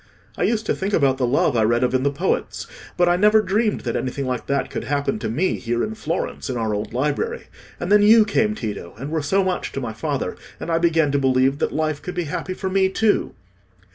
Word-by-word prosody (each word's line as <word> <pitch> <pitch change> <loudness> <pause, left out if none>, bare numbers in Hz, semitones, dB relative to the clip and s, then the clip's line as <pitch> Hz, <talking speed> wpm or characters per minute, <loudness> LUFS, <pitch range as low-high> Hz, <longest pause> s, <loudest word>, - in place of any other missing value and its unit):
I - - -6
used 220 -1 0
to - - +1
think 195 +2 -3
about 135 -3 +2
the 125 - +1
love 130 +1 +2
I 115 - +3
read 120 +3 +2
of 125 - +1
in 130 - +2
the 140 - +2
poets, 155 +7 -2 0.3
but 175 - +4
I 175 0 +3
never 210 +3 +5
dreamed 215 +2 0
that 115 - -3
anything 135 +2 -2
like 125 -2 -3
that 140 -1 -1
could - - -4
happen 145 +9 -1
to - - -3
me 155 +12 0
here 120 0 -1
in 220 - -3
Florence 170 -8 -4
in 125 - -2
our 110 -2 -1
old 105 +1 -3
library. 150 - -2 0.3
And 175 - -3
then 210 0 +6
you 215 +1 +7
came, 215 +1 +1
Tito, 105 - -6
and 135 +6 -6
were 160 -1 0
so 190 +7 +1
much 185 -1 -2
to - - -3
my 120 -4 -4
father, 140 +4 -3 0.2
and 170 - -4
I 165 - +2
began 165 -3 +2
to 140 - +1
believe 130 +1 +2
that - - 0
life 155 -1 -1
could 180 - -6
be 175 - -1
happy 175 +4 -4
for 190 - -4
me 190 0 +2
too." 215 +2 +1
150 Hz, 245 wpm, -22 LUFS, 130-190 Hz, 0.3 s, you